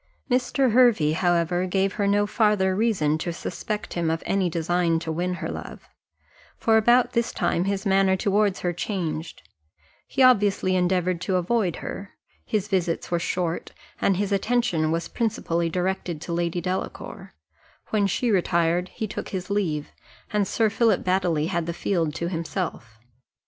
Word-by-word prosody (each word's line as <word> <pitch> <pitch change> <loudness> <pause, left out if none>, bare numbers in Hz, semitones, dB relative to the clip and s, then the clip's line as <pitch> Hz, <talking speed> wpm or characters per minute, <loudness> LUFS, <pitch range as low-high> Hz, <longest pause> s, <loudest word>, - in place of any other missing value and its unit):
Mr. 255 +1 +2
Hervey, 225 -11 +4
however, 175 +1 +1
gave 195 +1 +1
her 205 -2 0
no 205 +1 +3
farther 205 -3 +2
reason 185 -9 +1
to 170 - -2
suspect 200 +4 -5
him 170 -2 0
of 160 0 -2
any 195 -2 +1
design 170 0 +1
to 160 0 -4
win 180 +3 -1
her - - -4
love; - - -8 0.7
for 225 - +2
about 240 +3 +4
this 235 0 0
time 175 - 0
his 195 0 -2
manner 195 -1 +3
towards 200 0 +1
her 175 -1 -1
changed, 170 -3 -4 0.6
he 270 - +1
obviously 205 -6 +4
endeavoured 180 -1 +1
to 190 0 -1
avoid 185 0 +1
her; 195 0 -7 0.3
his 210 -2 -1
visits 180 -5 -1
were 170 - +2
short, 175 -1 -2 0.3
and 195 - +2
his 205 +1 -1
attention 200 -6 +1
was 165 +1 -1
principally 170 -7 -1
directed 180 -1 -2
to 170 +2 -5
Lady 170 0 -1
Delacour; 185 +2 -5 0.6
when 205 -2 +2
she 235 +4 0
retired, 175 -1 +1
he 220 - -2
took 215 - -6
his 190 0 -5
leave, 165 -8 -1 0.4
and 205 -2 +2
Sir 220 -2 +1
Philip 225 +1 +2
Baddely 180 -5 +1
had 170 -3 -1
the 170 - -3
field 165 -6 0
to 170 - -2
himself. 165 - -4
185 Hz, 160 wpm, -25 LUFS, 170-205 Hz, 0.7 s, Hervey